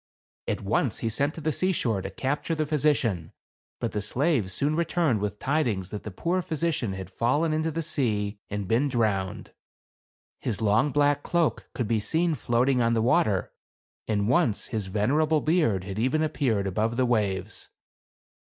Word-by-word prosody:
At - - -1
once - - 0
he 115 - -2
sent 140 +7 0
to 165 - -7
the 155 +1 0
seashore 135 - 0
to - - -5
capture 145 +4 -2
the 155 -1 0
physician; 140 - 0 0.5
but - - -2
the 105 - -2
slaves 120 - 0
soon 145 +11 0
returned 165 -7 +1
with 105 0 -3
tidings 120 - 0
that 105 - -5
the - - -6
poor 170 - -1
physi 170 -1 -1
cian 115 -8 -2
had 95 -1 -7
fallen 145 - +1
into 155 +1 0
the 165 +1 -3
sea 110 -10 -1
and 105 -2 -3
been 120 +8 +2
drowned; 105 -7 -1 0.9
his 110 -5 -3
long 110 +6 +2
black 145 0 +2
cloak 170 -1 0
could 120 -5 -1
be 110 0 +1
seen 165 +9 +1
floating 125 -1 +1
on 115 0 +2
the 115 - +2
water, 110 -5 +2 0.6
and 105 -2 0
once 115 -3 +2
his 105 -4 -2
venerable 145 +11 +2
beard 150 - +1
had 95 +2 -5
even 130 +7 +1
ap 155 0 -1
peared 110 -8 +1
above 110 +5 -1
the 130 - +3
waves. 105 -4 -1
120 Hz, 175 wpm, -26 LUFS, 105-155 Hz, 0.9 s, the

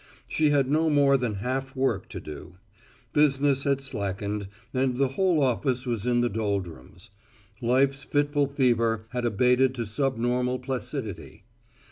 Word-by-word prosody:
She 155 -1 +2
had 140 -2 +2
no 155 +3 +2
more 140 -2 +4
than 125 -5 -1
half 135 +2 -3
work 130 -7 -1
to - - -6
do. 80 +4 -10 0.6
Business 140 -2 +3
had 140 -1 +1
slackened 100 -4 -3 0.3
and 130 -1 0
the 135 0 +2
whole 170 +1 +2
office 130 0 0
was 120 -2 -2
in 120 -1 +3
the 120 - +2
doldrums. 100 - -4 0.5
Life's 135 +3 +2
fitful 145 0 +1
fever 115 -5 +1
had 125 0 -3
abated 125 +3 +3
to 120 -2 -3
subnormal 125 +1 0
placidity. 125 - -5
130 Hz, 140 wpm, -26 LUFS, 115-140 Hz, 0.6 s, more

